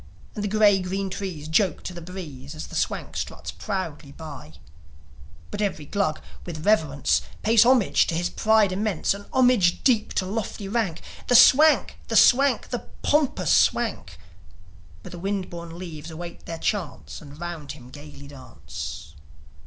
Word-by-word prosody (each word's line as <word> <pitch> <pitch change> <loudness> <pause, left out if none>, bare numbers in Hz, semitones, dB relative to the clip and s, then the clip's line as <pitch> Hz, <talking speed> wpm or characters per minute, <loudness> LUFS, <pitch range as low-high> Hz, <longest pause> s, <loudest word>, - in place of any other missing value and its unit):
And 210 - -5
the - - 0
gay 205 -2 +4
green 190 +1 -3
trees 180 -6 -5
joke 170 +1 +1
to 180 - -6
the 175 - -8
breeze, 160 -6 -9
As 155 - -6
the - - -10
Swank - - -2
struts - - -5
proudly 170 -8 -5
by; 145 - -10 1.0
But 205 - -4
every 190 -7 -2
Glug, 155 -2 -1 0.2
with 160 -3 -7
reverence, 155 -10 +2 0.2
Pays 225 +1 +5
homage 250 -6 +4
to 165 - -2
his 175 +1 0
pride 215 -3 +3
immense 195 -2 0
A 200 0 -10
homage 245 -9 +3
deep 230 -5 +2
to 185 - 0
lofty 205 0 -4
rank 195 -6 -2 0.2
The 245 - +3
Swank! 295 +5 +6
The - - -2
Swank! 275 +2 +5
The - - -5 0.2
pompous 295 -2 +1
Swank! 200 - +1 0.9
But - - -10
the 175 - -8
wind 195 0 -3
borne 170 -1 -8
leaves 165 -3 -8
await 170 +1 -9
their 165 - -5
chance 180 -2 -3
And 145 -1 -13
round 170 -5 -6
him 125 -4 -14
gaily 145 -1 -12
dance. 130 - -9
180 Hz, 160 wpm, -24 LUFS, 155-210 Hz, 1.0 s, Swank